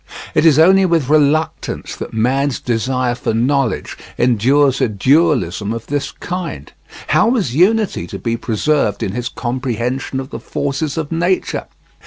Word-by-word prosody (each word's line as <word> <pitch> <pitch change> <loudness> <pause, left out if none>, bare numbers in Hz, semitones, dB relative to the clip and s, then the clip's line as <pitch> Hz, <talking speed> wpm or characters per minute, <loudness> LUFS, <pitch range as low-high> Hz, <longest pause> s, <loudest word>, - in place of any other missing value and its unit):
It 165 - +4
is 150 -3 +5
only 190 +4 +6
with 165 -7 +1
reluctance 155 +1 0
that - - -6
man's 130 +4 0
desire 125 +1 -1
for 120 -2 -2
knowledge 130 +1 0 0.2
endures 130 +3 +3
a - - +2
dualism 110 - +1
of 115 0 -5
this 145 0 -2
kind. 175 - -6 0.4
How 215 - +4
was 215 - 0
unity 205 - +2
to - - -7
be 115 -1 -2
preserved 115 0 0
in 95 - -2
his 120 +3 -3
comprehension 125 +1 -3
of 135 +1 -7
the - - -5
forces 140 +2 -3
of 155 -1 -3
nature? 175 +3 -1
135 Hz, 150 wpm, -17 LUFS, 120-155 Hz, 0.4 s, only